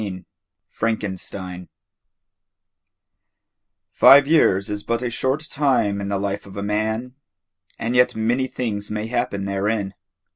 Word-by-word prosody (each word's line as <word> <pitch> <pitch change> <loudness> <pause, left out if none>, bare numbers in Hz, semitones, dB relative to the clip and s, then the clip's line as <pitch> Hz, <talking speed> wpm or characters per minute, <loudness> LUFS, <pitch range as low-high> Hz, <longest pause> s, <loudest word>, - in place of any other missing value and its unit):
XIV 95 -3 -6 0.5
FRANKENSTEIN 95 -4 -4 2.2
Five 140 +1 +7
years 100 -11 +3
is 105 0 -4
but 115 +3 -2
a 120 - -2
short 130 +5 -1
time 130 -10 +1
in 100 - -4
the 100 - 0
life 100 0 -3
of 100 - -11
a 100 - -3
man, 110 +4 -2 0.6
and 115 +2 -2
yet 125 0 +4
many 120 +4 0
things 105 -5 -4
may 105 0 -3
happen 100 -4 -2
therein. 100 0 -1
105 Hz, 125 wpm, -22 LUFS, 100-125 Hz, 2.2 s, Five